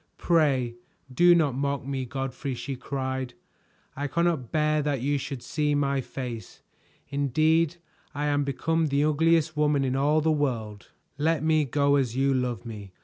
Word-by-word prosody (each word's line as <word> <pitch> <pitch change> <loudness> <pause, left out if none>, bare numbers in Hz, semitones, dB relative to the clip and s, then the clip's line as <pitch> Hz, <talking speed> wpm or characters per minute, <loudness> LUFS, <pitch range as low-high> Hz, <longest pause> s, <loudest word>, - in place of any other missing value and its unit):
"Pray 135 -8 +1 0.4
do 175 +5 +6
not 155 -6 +2
mock 140 0 -2
me, 135 -1 -3
Godfrey," 135 +1 -4
she 135 +3 -5
cried, 130 -1 -4 0.6
"I 145 +1 -2
cannot 170 -6 0
bear 155 0 +2
that 145 -2 -1
you 140 +2 0
should 135 -2 -6
see 150 +3 0
my 140 -1 +1
face. 120 -5 -7 0.5
Indeed 155 +4 +2 0.4
I 145 +1 -1
am 145 -1 +1
become 160 +4 0
the 140 0 +1
ugliest 155 +1 +2
woman 150 -2 +2
in 130 0 -1
all 145 +3 +3
the 160 +1 +2
world. 115 -9 -2 0.3
Let 160 0 +1
me 155 -1 +3
go, 140 +1 +2
as 125 -4 -1
you 135 +1 +2
love 125 -6 -2
me. 105 -5 -8
140 Hz, 160 wpm, -26 LUFS, 130-155 Hz, 0.6 s, do